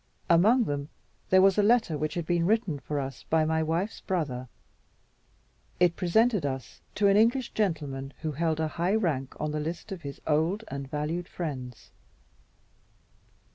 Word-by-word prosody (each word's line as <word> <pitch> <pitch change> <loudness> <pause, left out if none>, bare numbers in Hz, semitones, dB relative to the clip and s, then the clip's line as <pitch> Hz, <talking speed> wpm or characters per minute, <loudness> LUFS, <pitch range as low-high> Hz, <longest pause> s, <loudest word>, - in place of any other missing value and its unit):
Among 215 +9 +5
them 145 -5 -3 0.4
there 185 0 +6
was 195 +1 +5
a - - +6
letter 220 -5 +3
which 150 +1 -2
had 170 -2 -2
been 170 0 +1
written 210 -8 +1
for 145 +3 -3
us 135 -2 -5
by 160 -1 +3
my 160 0 +1
wife's 165 +7 -2
brother. 140 -9 -2 1.3
It 175 -1 +4
presented 210 +2 +2
us 130 -3 -5
to 205 - +3
an 200 0 +5
English 235 +3 +3
gentleman 145 -9 -2
who 155 - -1
held 160 +1 -1
a 160 - +1
high 175 +5 0
rank 150 -11 -1
on 150 0 -2
the 150 - -2
list 165 +7 -5
of 190 -3 -5
his 140 -1 -7
old 160 +8 +1
and 140 -1 -6
valued 155 +4 -3
friends. 130 -8 -6
165 Hz, 165 wpm, -28 LUFS, 150-195 Hz, 1.3 s, there